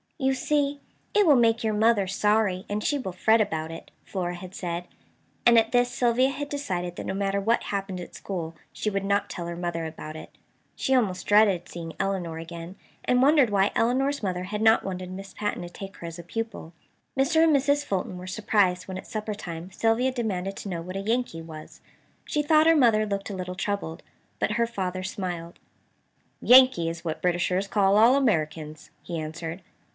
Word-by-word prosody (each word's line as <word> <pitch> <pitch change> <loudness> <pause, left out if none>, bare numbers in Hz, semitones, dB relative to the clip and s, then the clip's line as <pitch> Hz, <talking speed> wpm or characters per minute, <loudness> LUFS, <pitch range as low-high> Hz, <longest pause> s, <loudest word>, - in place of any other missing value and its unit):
"You 265 -3 +1
see, 285 +1 0 0.4
it 415 -1 +5
will 300 -4 +6
make 230 -2 +3
your 220 -1 +1
mother 210 -2 +3
sorry, 205 -1 +1
and 210 +1 -2
she 290 - +1
will 190 -8 -4
fret 220 +5 +3
about 160 -6 -2
it," 165 - -9
Flora 180 -2 -3
had 180 +1 -10
said; 175 0 -4 0.6
and 235 -1 +7
at 225 0 0
this 245 0 +3
Sylvia 245 +1 +2
had 290 +1 -4
decided 180 -12 -3
that - - -6
no - - -2
matter 195 0 0
what 230 +4 +2
happened 195 -2 -3
at 175 - -9
school 165 -4 -5 0.2
she 215 - -2
would 195 -1 -2
not 200 +1 +1
tell 170 -1 -5
her 170 - -4
mother 170 -1 -3
about 155 -1 -7
it. 155 - -9 0.5
She 265 - 0
almost 195 -7 0
dreaded 205 -4 +4
seeing 165 -1 -7
Elinor 190 -4 -2
again, 165 +2 -8 0.3
and 250 0 +2
wondered 280 -2 +5
why 200 0 +3
Elinor's 270 +5 +1
mother 180 -2 -2
had 210 +3 -4
not 220 0 +5
wanted 185 -1 -5
Miss 195 +1 -8
Patten 210 -4 -2
to 175 - -7
take 195 +2 -9
her 170 - -7
as 165 +1 -8
a - - -7
pupil. 225 -2 -5 0.4
Mr. 320 +4 +4
and 320 -2 +5
Mrs. 285 +1 +2
Fulton 185 -4 -2
were 180 +1 -8
surprised 185 -3 +1
when 190 -1 -5
at - - -9
supper 215 -2 -4
time 170 -2 -7
Sylvia 225 +6 +1
demanded 195 -6 -2
to 200 - -6
know 170 -3 -3
what 185 +2 -6
a - - -2
"Yankee" 225 -5 -1
was. 155 -1 -11 0.5
She 300 - 0
thought 310 +1 +5
her 330 - +6
mother 230 -7 +4
looked 200 -1 -3
a - - -4
little 180 -1 -5
troubled. 195 -4 -3 0.4
But 210 - 0
her 235 +2 +1
father 185 -5 -3
smiled. 180 -3 -5 0.8
"Yankee 250 -10 +6
is 165 +1 -7
what 160 -1 -3
Britishers 180 +2 +1
call 200 -1 +3
all 230 +4 +6
Americans," 155 - -1
he 170 -2 -4
answered. 160 +3 -6
195 Hz, 200 wpm, -26 LUFS, 175-230 Hz, 0.8 s, and